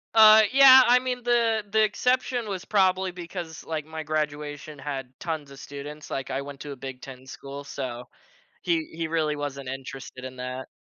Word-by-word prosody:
Uh, 220 0 +9
yeah, 265 -1 +9
I 245 - +7
mean, 250 -1 -3
the 230 -3 +2
the 220 +1 +3
exception 245 +1 0
was 190 -2 -4
probably 190 -2 +2
because, 175 -2 -7
like, 155 -2 -4
my 160 0 -6
graduation 150 -1 -4
had 135 -3 -5
tons 155 -4 -4
of 135 - -12
students, 145 +2 -9
like, 135 -1 -4
I 135 +1 -1
went 140 -1 -9
to 145 - -7
a - - -6
Big 130 -1 -8
10 130 -1 -11
school, 140 +2 -8
so 125 -3 -6 0.6
he 165 -3 0
he 165 0 -3
really 155 -2 0
wasn't 140 -2 -5
interested 135 -1 -8
in 130 0 -7
that. 125 +1 -6
150 Hz, 185 wpm, -26 LUFS, 135-195 Hz, 0.6 s, Uh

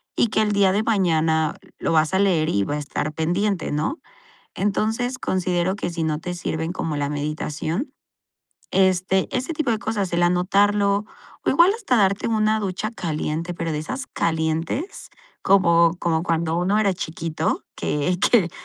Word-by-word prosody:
y - - +3
que 220 0 +1
el 210 -1 +1
día 200 -2 +4
de 205 +3 +1
mañana 160 -7 +1 0.2
lo - - -1
vas 155 +2 +2
a 190 - +3
leer, 180 -6 +2
y 100 - +1
va 145 - -2
a - - -2
estar 150 +1 -3
pendiente, 175 +4 -1
¿no?, 155 - -1 0.6
entonces, 220 +5 -1
considero 185 0 0
que 200 - -3
si 170 -1 -3
no 155 -1 -1
te 180 +2 -5
sirven 165 -1 -3
como 160 -4 -3
la 145 0 -1
meditación, 150 - -3 0.8
este, 190 0 +2
ese 255 +6 -1
tipo 300 -5 0
de 225 - +1
cosas, 210 -5 -2
el 170 0 +1
anotarlo, 200 +3 +2 0.4
o - - +2
igual 345 +3 +5
hasta 405 - 0
darte 200 -1 +2
una 215 -1 +2
ducha 200 +2 -3
caliente, 165 -3 -3
pero 165 -1 -3
de 150 - -2
esas 160 - -5
calientes, 165 - -2 0.3
como 170 -3 +4
como 165 -1 +1
cuando 165 -1 0
uno 185 +4 +1
era 205 -3 +3
chiquito, 165 -3 -3
que 165 +5 -1
que 195 -8 +3
180 Hz, 165 wpm, -23 LUFS, 160-205 Hz, 0.8 s, igual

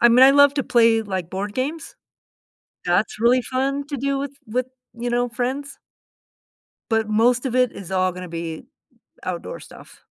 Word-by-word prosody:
I 240 - +7
mean, 245 +2 +7
I 270 - +8
love 285 0 +6
to 275 - 0
play, 230 -2 +4
like, 190 -5 -4
board 200 +2 -4
games. 295 +6 -4 0.9
That's 180 +5 +1
really 240 +3 +4
fun 275 +3 -2
to 285 - -4
do 275 +2 -1
with 275 0 -3
with, 250 +3 -2 0.3
you 240 +1 -4
know, 245 +1 +1
friends 260 +4 -3 1.1
but 225 -1 +1
most 235 +4 +2
of 250 - -3
it 250 -1 +3
is 190 -3 -9
all 185 -1 +1
gonna 180 0 -8
be 165 +1 -5 0.6
outdoor - - -5
stuff. - - -15
240 Hz, 170 wpm, -22 LUFS, 210-270 Hz, 1.1 s, I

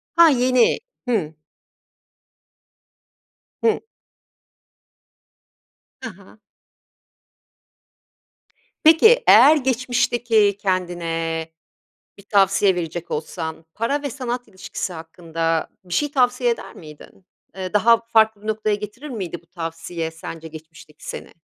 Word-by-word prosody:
Ha, 335 -1 +7
yeni, 255 -3 +3 0.3
hı. 190 -11 -1 2.3
Hı. 445 -2 +2 2.2
Ha - - -5
ha. - - -19 2.4
Peki 445 +11 +6
eğer 275 +8 +8
geçmişteki 240 -5 +1
kendine 170 -4 -2 0.7
bir 200 - -15
tavsiye 195 -1 +3
verecek 170 0 -5
olsan 160 +1 -5
para 235 +6 -1
ve 285 - -3
sanat 245 -1 -5
ilişkisi 190 -2 -6
hakkında 165 0 -3
bir 180 -1 -8
şey 295 -1 0
tavsiye 250 -2 +2
eder 195 -4 -4
miydin? 155 +3 -14 0.3
Eee, 185 0 -6
daha 230 +3 +5
farklı 220 -2 +3
bir 215 - -10
noktaya 215 -1 0
getirir 210 +8 -8
miydi 190 - -5
bu 170 - -31
tavsiye 165 -1 -5
sence 165 0 -9
geçmişteki 160 -1 -14
seni? - - -7
200 Hz, 100 wpm, -21 LUFS, 165-245 Hz, 2.4 s, eğer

